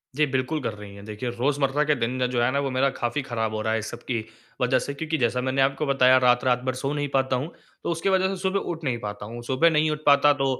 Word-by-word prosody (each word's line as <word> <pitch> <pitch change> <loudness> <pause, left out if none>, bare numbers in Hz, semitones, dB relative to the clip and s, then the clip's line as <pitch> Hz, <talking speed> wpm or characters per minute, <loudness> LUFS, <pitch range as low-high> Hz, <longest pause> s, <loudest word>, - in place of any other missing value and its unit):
जी, 150 +2 +3
बिल्कुल 135 +3 -1
कर 115 - -3
रही 105 -1 -11
हैं। 100 - -11
देखिए, 110 +3 -5
रोज़मर्रा 135 +3 0
के 150 0 +2
दिन 120 -2 -1
में 125 -1 +1
जो 125 -1 0
है 120 - +3
ना 140 - 0
वो 140 -1 -1
मेरा 130 +2 +2
काफ़ी 120 +1 -2
खराब 115 -4 -3
हो 110 - -2
रहा 110 +1 0
है 110 - +1
इस 110 - -5
सब - - -9
की 115 -3 -2 0.4
वजह 125 +1 +3
से। 140 - -4
क्योंकि 160 +2 -2
जैसा 125 -1 +1
मैंने 130 +1 0
आपको 135 +3 +1
बताया 130 -2 +5
रात-रात 125 0 +3
भर - - 0
सो 135 +2 -2
नहीं 145 -1 -1
पाता 130 -1 +2
हूँ 140 +7 -3 0.3
तो - - -2
उसकी 165 +3 -1
वजह 190 0 +3
से 195 - -2
सुबह 190 +1 +1
उठ 170 -1 -5
नहीं 130 -5 -1
पाता 105 -1 -6
हूँ। 120 +3 -8
सुबह 130 +7 +3
नहीं 155 -1 +2
उठ 150 - -3
पाता 145 0 +6
तो - - +2
130 Hz, 285 wpm, -25 LUFS, 120-145 Hz, 0.4 s, पाता